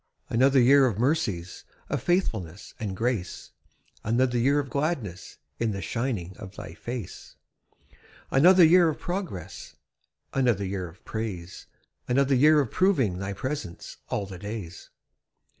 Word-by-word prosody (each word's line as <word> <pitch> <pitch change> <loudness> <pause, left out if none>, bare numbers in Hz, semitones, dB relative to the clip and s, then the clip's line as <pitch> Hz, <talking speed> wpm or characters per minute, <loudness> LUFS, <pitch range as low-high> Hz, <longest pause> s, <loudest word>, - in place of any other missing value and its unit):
Another 130 +3 +4
year 135 +2 +6
of 110 -6 -2
mercies, 110 - -1 0.2
Of - - -2
faithfulness 110 - -1
and 100 -5 -4
grace; 115 -6 -2 0.5
Another 125 +3 +1
year 140 +5 +3
of 145 -2 0
gladness 140 - -3 0.2
In 115 -2 0
the 100 - -4
shining 115 -8 -3
of 100 -2 -10
Thy 80 - -8
face. 120 +1 -7 1.0
Another 180 +6 +7
year 170 +1 +6
of 155 - -3
progress, 175 - -6 0.6
Another 120 -7 +1
year 95 -2 -4
of 95 +7 -20
praise; 100 -6 -6 0.4
Another 135 +2 +2
year 150 +4 +6
of 130 - -4
proving 135 - +2
Thy 100 0 -3
presence 130 - -5
'all 100 - -1
the 95 -2 -9
days.' 100 -4 -7
115 Hz, 135 wpm, -26 LUFS, 95-140 Hz, 1.0 s, Another